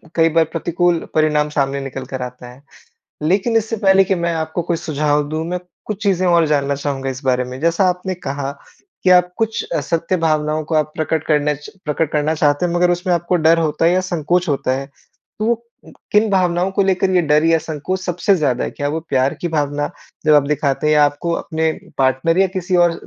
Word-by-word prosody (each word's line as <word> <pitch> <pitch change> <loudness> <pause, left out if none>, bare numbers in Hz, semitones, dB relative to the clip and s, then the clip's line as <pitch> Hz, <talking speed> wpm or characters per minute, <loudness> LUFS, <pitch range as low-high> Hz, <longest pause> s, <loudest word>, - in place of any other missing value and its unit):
कई 165 0 +4
बार 165 0 +3
प्रतिकूल 170 +1 0
परिणाम 150 -1 +2
सामने 140 -1 -1
निकल 135 -1 -6
कर 130 0 -6
आता 125 0 -7
है। 130 +3 -17 0.6
लेकिन 195 +8 +1
इससे 225 +1 0
पहले 195 -1 +4
कि 190 - +1
मैं 170 -1 -1
आपको 160 +2 -2
कोई 170 0 -1
सुझाव 150 -2 0
दूँ 155 +1 -3
मैं 180 0 -2 0.3
कुछ 215 -1 -5
चीज़ें 185 -3 +1
और 170 -2 +4
जानना 140 -1 +1
चाहूँगा 135 -1 -3
इस 130 +2 -7
बारे 125 -1 +1
में, 125 +1 -8
जैसा 170 +3 +2
आपने 180 +1 -2
कहा 140 -5 -4 0.5
कि 185 - +4
आप 180 0 +5
कुछ 225 -1 -1 0.2
सत्य 170 +2 -1
भावनाओं 155 -2 0
को 160 - -3
आप 155 0 +1
प्रकट 160 0 -1
करना 150 -1 +2
च 145 +1 -11
प्रकट 150 +1 -1
करना 150 +1 +1
चाहते 145 +2 +2
हैं 170 - -3
मगर 175 0 +3
उसमें 175 +1 0
आपको 175 +1 0
डर 165 0 +4
होता 155 0 0
है 170 - +5
या 185 - +2
संकोच 180 -1 -1
होता 135 -2 0
है 135 - -6 0.5
तो 215 - -1
वो 235 - +3 0.6
किन 210 +1 +4
भावनाओं 180 -1 +1
को 200 - +2
लेकर 190 0 +1
ये 180 -1 +3
डर 150 0 +3
या 165 0 +4
संकोच 160 +5 -4
सबसे 185 +2 +1
ज़्यादा 135 -6 0
है? - - -4
क्या 145 - -3
वो 160 +3 -2
प्यार 130 +1 +1
की 175 - -2
भावना 145 -1 -1 0.4
जब 155 - +6
आप 145 - +6
दिखाते 145 0 0
हैं 155 - +3
या 150 -1 +6
आपको 145 +4 -1
अपने 160 -1 -1 0.3
पार्टनर 135 +6 +2
या 195 - +5
किसी 185 -1 -2
और 175 -1 +4
160 Hz, 215 wpm, -18 LUFS, 145-180 Hz, 0.6 s, जब